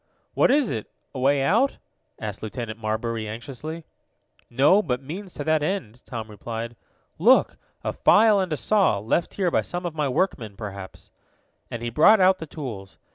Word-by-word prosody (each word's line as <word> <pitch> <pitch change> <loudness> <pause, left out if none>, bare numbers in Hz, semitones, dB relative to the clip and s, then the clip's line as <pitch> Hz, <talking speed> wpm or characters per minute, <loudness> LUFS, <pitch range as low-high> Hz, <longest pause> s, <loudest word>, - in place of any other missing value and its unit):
"What - - +3
is 280 -2 +3
it 110 -4 -4 0.2
a 135 - -5
way 135 +1 +3
out?" 230 - +2 0.4
asked 105 -3 -5
Lieutenant 110 0 -5
Marbury 110 0 -2
anxiously. 140 +8 -7 0.6
"No, 145 - +4
but 125 -8 -3
means 185 +7 -7
to 145 - -4
that 155 0 +2
end," 150 - -3
Tom 115 -3 -5
replied. 115 +2 -6 0.4
"Look, - - +4 0.3
a - - -2
file 215 -1 +5
and 185 -3 -1
a 155 - 0
saw, 200 - +2
left 110 - -1
here 185 -3 0
by - - +2
some 175 0 -5
of 170 - -3
my 150 -3 -1
workmen, 125 - -1
perhaps," 100 -2 -9 0.6
and 120 0 -6
he 120 - -3
brought 195 - +6
out 185 0 +4
the 160 - -7
tools. 115 -12 -8
135 Hz, 175 wpm, -24 LUFS, 110-180 Hz, 0.6 s, brought